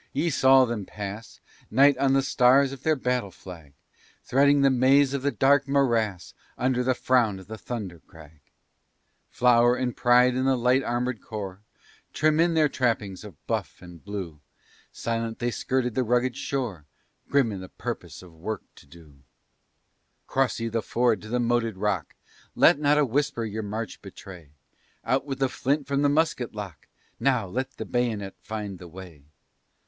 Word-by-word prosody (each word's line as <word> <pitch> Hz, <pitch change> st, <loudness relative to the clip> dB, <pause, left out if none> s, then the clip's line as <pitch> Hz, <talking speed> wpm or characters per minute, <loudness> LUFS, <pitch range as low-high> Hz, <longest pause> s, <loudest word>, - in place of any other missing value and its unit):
ye 170 Hz, -, 0 dB
saw 130 Hz, -1 st, +5 dB
them 115 Hz, -4 st, -4 dB
pass, 105 Hz, +3 st, -8 dB, 0.3 s
Night 140 Hz, +5 st, +5 dB
on 135 Hz, -1 st, +3 dB
the 135 Hz, 0 st, +3 dB
stars 135 Hz, +1 st, +4 dB
of 135 Hz, -2 st, -9 dB
their 155 Hz, +2 st, +2 dB
battle 125 Hz, -5 st, -1 dB
flag, 85 Hz, -7 st, -12 dB, 0.5 s
Threading 140 Hz, +2 st, +3 dB
the 135 Hz, -, +5 dB
maze 135 Hz, +2 st, +4 dB
of 140 Hz, -, -2 dB
the 140 Hz, -, +1 dB
dark 140 Hz, 0 st, +3 dB
morass 115 Hz, -9 st, 0 dB, 0.2 s
Under 125 Hz, 0 st, +1 dB
the 130 Hz, 0 st, +1 dB
frown 120 Hz, -6 st, +2 dB
of 95 Hz, -, -12 dB
the 110 Hz, -, -8 dB
Thunder 105 Hz, -7 st, -6 dB
Crag; 80 Hz, -1 st, -17 dB, 0.9 s
Flower 120 Hz, 0 st, +4 dB
and 125 Hz, -1 st, -2 dB
pride 125 Hz, 0 st, +4 dB
of 130 Hz, -, 0 dB
the 135 Hz, -1 st, +2 dB
Light 125 Hz, +2 st, +3 dB
Armed 120 Hz, -1 st, -2 dB
Corps, 100 Hz, -3 st, -7 dB, 0.5 s
Trim 155 Hz, +1 st, +2 dB
in 170 Hz, 0 st, +3 dB
their 155 Hz, -2 st, +4 dB
trappings 115 Hz, -8 st, -2 dB
of 100 Hz, -9 st, -13 dB
buff -, -, -3 dB
and 90 Hz, -2 st, -13 dB
blue, 95 Hz, -7 st, -6 dB, 0.5 s
Silent, 115 Hz, 0 st, -3 dB
they 120 Hz, 0 st, -1 dB
skirted 125 Hz, 0 st, -1 dB
the 130 Hz, -, 0 dB
rugged 125 Hz, +1 st, +1 dB
shore, 120 Hz, -, -4 dB, 0.4 s
Grim 140 Hz, -5 st, +2 dB
in 100 Hz, -, -5 dB
the 95 Hz, 0 st, -9 dB
promise -, -, -7 dB
of 90 Hz, -2 st, -15 dB
work 95 Hz, +6 st, -5 dB
to -, -, -17 dB
do. 75 Hz, -2 st, -17 dB, 1.1 s
"Cross 135 Hz, -2 st, 0 dB
ye 115 Hz, -, -2 dB
the 115 Hz, 0 st, -1 dB
ford 115 Hz, -2 st, +1 dB
to 110 Hz, -, -10 dB
the 125 Hz, +3 st, -1 dB
moated 115 Hz, -3 st, 0 dB
rock! 95 Hz, -5 st, -2 dB, 0.4 s
Let -, -, +5 dB
not 150 Hz, 0 st, +3 dB
a 150 Hz, -, +4 dB
whisper 135 Hz, -1 st, -1 dB
your 110 Hz, 0 st, -4 dB
march 110 Hz, 0 st, -5 dB
betray! 85 Hz, -7 st, -12 dB, 0.5 s
Out 135 Hz, +2 st, 0 dB
with 135 Hz, -2 st, -3 dB
the 135 Hz, -, +1 dB
flint 140 Hz, +3 st, -1 dB
from 140 Hz, 0 st, -1 dB
the 145 Hz, -, +3 dB
musket 145 Hz, -6 st, 0 dB
lock! 100 Hz, -6 st, -8 dB, 0.3 s
Now! 125 Hz, -6 st, +1 dB
let 130 Hz, +7 st, -4 dB
the -, -, -5 dB
bayonet 110 Hz, -6 st, -2 dB
find 105 Hz, -4 st, -6 dB
the 90 Hz, -, -10 dB
way!" 85 Hz, -4 st, -12 dB
120 Hz, 175 wpm, -26 LUFS, 100-135 Hz, 1.1 s, saw